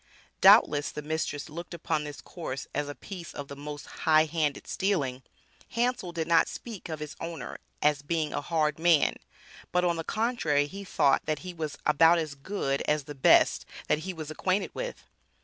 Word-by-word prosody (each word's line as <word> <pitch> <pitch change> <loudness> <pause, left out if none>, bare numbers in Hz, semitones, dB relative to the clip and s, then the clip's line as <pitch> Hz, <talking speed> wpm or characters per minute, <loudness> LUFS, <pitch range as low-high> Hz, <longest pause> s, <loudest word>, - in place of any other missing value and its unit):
Doubtless 145 0 +6
the 150 - -6
mistress 155 -1 -2
looked 170 +3 -7
upon 155 -2 -1
this 145 -1 -8
course 140 -6 -6
as 145 0 -2
a 145 - -6
piece 180 -4 -9
of 145 -1 -6
the 140 - -7
most 145 +1 -7
highhanded 155 -2 +1
stealing. 145 -10 -1 0.5
Hansel 235 -6 0
did 165 -1 -2
not 165 -1 +5
speak 220 -7 -8
of 155 -1 -4
his 150 -1 -6
owner 165 -1 -6 0.2
as 150 -1 +3
being 155 0 -1
a - - -1
hard 155 0 0
man, 165 -2 +4 0.6
but 180 0 +2
on 170 -1 +1
the 165 - -3
contrary 215 -10 +1
he 195 +7 -8
thought 145 -8 +2
that 155 -1 +1
he 180 - -5
was 155 -3 -4
about 165 +3 +6
as 155 -3 -2
"good" 140 -2 -2
as 150 -1 +2
the 145 - -8
best 135 - +5 0.3
that 150 - +3
he 185 +4 -4
was 155 -3 -7
acquainted 185 +5 0
with. - - -5
155 Hz, 185 wpm, -28 LUFS, 145-175 Hz, 0.6 s, Doubtless